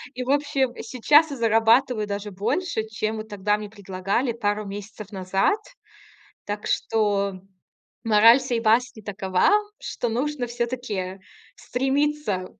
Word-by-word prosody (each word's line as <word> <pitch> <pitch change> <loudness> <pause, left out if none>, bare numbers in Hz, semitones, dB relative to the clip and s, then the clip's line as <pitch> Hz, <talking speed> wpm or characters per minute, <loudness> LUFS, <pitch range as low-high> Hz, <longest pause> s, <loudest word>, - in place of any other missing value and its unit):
И 250 - -3
в 255 - -7
общем, 280 -3 +1
сейчас 290 +7 +4
я 275 - -5
зарабатываю 225 0 +3
даже 205 0 -4
больше, 220 - -1
чем 215 0 -3
вот 215 0 -6
тогда 205 +1 0
мне 210 -1 -7
предлагали 200 +4 -2
пару 210 -2 -2
месяцев 205 +1 -8
назад. 195 - +1 0.9
Так 205 0 -4
что 205 -3 0 0.7
мораль 225 +3 +6
сей 245 -3 -1
басни 230 0 +2
такова, 190 - +1 0.3
что 240 - -3
нужно 260 +1 -2
всё-таки 235 -6 -4 0.4
стремиться 270 -6 -1
220 Hz, 125 wpm, -24 LUFS, 205-250 Hz, 0.9 s, мораль